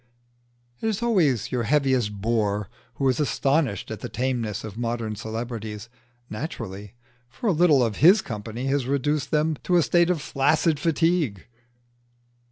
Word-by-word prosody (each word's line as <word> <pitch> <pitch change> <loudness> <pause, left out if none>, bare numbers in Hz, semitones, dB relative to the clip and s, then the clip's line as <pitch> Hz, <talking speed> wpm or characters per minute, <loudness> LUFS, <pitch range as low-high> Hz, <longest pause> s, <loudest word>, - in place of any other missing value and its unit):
It - - -2
is 220 +1 -2
always 165 - +2
your 125 -2 0
heaviest 125 -6 +1
bore 105 -3 0 0.2
who 135 - 0
is 130 -2 +1
astonished 135 - 0
at - - -5
the - - -6
tameness 120 -4 -2
of 110 -2 -7
modern 115 -2 -3
celebrities: 110 0 -6 0.4
naturally; 105 - -6 0.3
for 135 - -9
a 210 - +4
little 155 -6 +4
of 110 -3 -1
his 185 +8 +6
company 115 +2 -5
has 135 -2 0
reduced 140 +1 0
them 155 0 +1
to 180 - 0
a 170 - +4
state 175 +2 +3
of 180 -3 +1
flaccid 150 +2 +1
fatigue. 165 - +1
130 Hz, 150 wpm, -24 LUFS, 110-155 Hz, 0.4 s, his